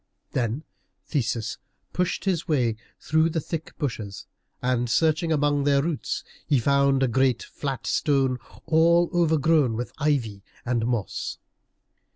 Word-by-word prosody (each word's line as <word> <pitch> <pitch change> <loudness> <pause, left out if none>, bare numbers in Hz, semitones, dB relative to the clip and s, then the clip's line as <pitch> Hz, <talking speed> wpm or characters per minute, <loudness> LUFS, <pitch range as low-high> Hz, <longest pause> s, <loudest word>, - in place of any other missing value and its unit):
Then 120 +4 -1 0.4
Theseus 115 -5 -2 0.3
pushed 180 +2 -1
his 180 -4 0
way 135 -8 +2
in 110 - -4 0.2
through 160 +1 +2
the 165 - -1
thick 160 +1 -6
bushes, 110 -9 -4 0.3
and 125 -1 0
searching 160 +5 +2
among 145 -2 +2
their 140 -1 +3
roots 165 -2 -2 0.2
he 145 - +3
found 140 +2 +3
a - - +3
great 130 0 +2
flat 135 -3 -5
stone, 135 -3 +1 0.3
all 170 +2 +4
overgrown 160 -6 +3
with 120 +2 -4
ivy 125 -9 0 0.2
and 120 -2 0
moss. 120 -5 -2
140 Hz, 135 wpm, -25 LUFS, 120-160 Hz, 0.4 s, all